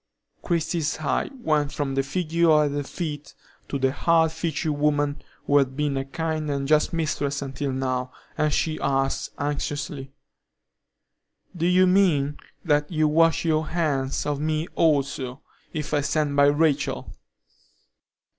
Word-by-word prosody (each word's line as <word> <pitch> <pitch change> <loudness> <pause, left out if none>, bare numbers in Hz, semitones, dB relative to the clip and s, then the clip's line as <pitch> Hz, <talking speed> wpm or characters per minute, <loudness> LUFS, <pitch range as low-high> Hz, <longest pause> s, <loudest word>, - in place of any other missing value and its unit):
Christie's 165 -2 -1
eye 155 - -1
went 155 - 0
from 140 -2 -2
the 135 - +2
figure 160 +1 +2
at 145 - 0
her 145 0 -1
feet 150 0 -6 0.3
to 140 - -1
the 135 -1 +1
hard 165 +2 +3
featured 160 -1 -2
woman 145 0 0 0.2
who 145 0 +4
had 135 -1 -1
been 150 -2 0
a 135 0 -2
kind 155 +1 -3
and 140 -1 -1
just 155 +1 +3
mistress 145 -3 -1
until 135 0 -3
now, 130 -1 -2 0.2
and 155 0 +1
she 155 +1 0
asked, 135 0 0
anxiously: 145 -1 -3 1.4
"Do 170 0 0
you 180 +1 +5
mean 170 -7 +2 0.3
that 150 -1 +1
you 155 -2 +2
wash 165 +2 +3
your 155 -1 +1
hands 145 -6 -1
of 145 -1 -1
me 155 +2 -1
also, 140 -4 0 0.3
if 150 -1 -4
I 145 - +3
stand 145 0 0
by 140 0 +6
Rachel?" 145 0 +1
150 Hz, 145 wpm, -24 LUFS, 140-160 Hz, 1.4 s, by